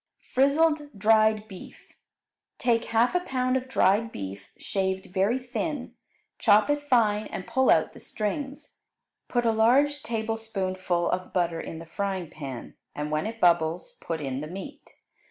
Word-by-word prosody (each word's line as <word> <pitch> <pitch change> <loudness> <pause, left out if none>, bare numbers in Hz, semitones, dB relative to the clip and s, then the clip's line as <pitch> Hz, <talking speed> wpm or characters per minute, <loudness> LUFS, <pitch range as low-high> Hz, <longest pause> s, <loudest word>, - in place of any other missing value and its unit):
Frizzled 295 0 +2
Dried 215 +1 +3
Beef 190 -4 -12 0.6
Take 235 -2 +1
half 230 +2 +2
a 360 - +3
pound 255 -6 -1
of 260 0 -1
dried 225 -3 +2
beef, 100 0 -7
shaved 190 -1 -2
very 200 +6 +2
thin. 260 +2 -4 0.5
Chop 210 +4 +5
it 290 0 0
fine 215 -4 +3
and 180 - -6
pull 260 0 +2
out - - +4
the - - -12
strings. 270 +6 -4 0.5
Put 240 -1 0
a 230 - +4
large 265 +6 +3
tablespoonful 200 -6 -2
of 185 0 -3
butter 170 -2 0
in 160 - -7
the 165 - -9
frying 190 -1 -3
pan, 135 -7 -7 0.2
and 150 +1 -3
when 155 +7 0
it 225 0 -6
bubbles 175 - +2
put 165 -1 -3
in 135 -1 -3
the 150 - -5
meat. 195 - -9
215 Hz, 155 wpm, -27 LUFS, 180-255 Hz, 0.6 s, Chop